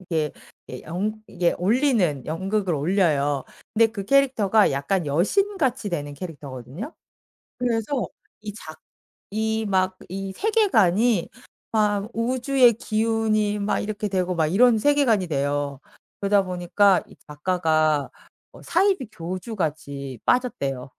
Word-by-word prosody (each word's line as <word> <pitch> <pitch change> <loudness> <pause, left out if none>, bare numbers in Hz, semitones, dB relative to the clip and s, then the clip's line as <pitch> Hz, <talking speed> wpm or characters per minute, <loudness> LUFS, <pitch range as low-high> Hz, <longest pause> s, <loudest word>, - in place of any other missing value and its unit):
이게 160 -5 -2 0.4
예 125 - -8
연 210 +6 -3
이게 175 -1 0
올리는 200 - +2
연극을 190 +2 -1
올려요. 145 -4 +1 0.3
근데 225 +1 +5
그 210 -3 -6
캐릭터가 225 -5 +3
약간 150 +5 -1
여신 385 - +1
같이 255 - 0
되는 145 -4 -4
캐릭터거든요? 145 - -8 0.6
그래서 245 +1 -1 0.3
이 210 -1 -6
작 155 -6 -11 0.5
이 220 0 -1
막 185 -1 +1
이 195 +1 -5
세계관이 235 - +2 0.4
막 210 0 +1
우주의 250 +1 +3
기운이 215 -1 0
막 200 - 0
이렇게 210 0 -3
되고 185 -1 -1
막 160 -2 +2
이런 230 +5 +4
세계관이 250 -7 +3
돼요. 145 -1 -1 0.4
그러다 200 0 +3
보니까 180 +1 +2
이 - - -16
작가가 155 -2 +1 0.4
어 - - -14
사이비 365 - +1
교주같이 160 - -4
빠졌대요. 140 - 0
195 Hz, 265 characters per minute, -24 LUFS, 160-225 Hz, 0.6 s, 근데